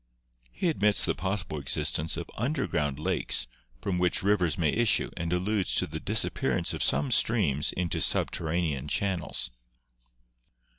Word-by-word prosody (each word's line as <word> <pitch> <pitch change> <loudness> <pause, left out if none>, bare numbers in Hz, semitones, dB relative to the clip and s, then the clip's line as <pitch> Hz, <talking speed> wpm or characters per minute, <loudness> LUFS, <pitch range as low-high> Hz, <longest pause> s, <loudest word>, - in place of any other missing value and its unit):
He 180 - -2
admits 105 -9 +3
the - - +1
possible 95 -2 -2
existence 75 +3 0
of - - -5
underground 115 - -1
lakes 75 - 0 0.4
from 90 -3 -1
which 90 0 +1
rivers 90 -7 +2
may 80 -4 +2
issue 120 -4 +2
and 85 -1 -3
alludes 95 +2 0
to - - +3
the - - -6
dis - - +1
appearance 65 -2 -1
of - - -4
some 135 - +1
streams 95 - +2
into 90 -3 -1
subterranean 80 -4 0
channels. 90 -7 -1
90 Hz, 140 wpm, -28 LUFS, 75-105 Hz, 0.4 s, admits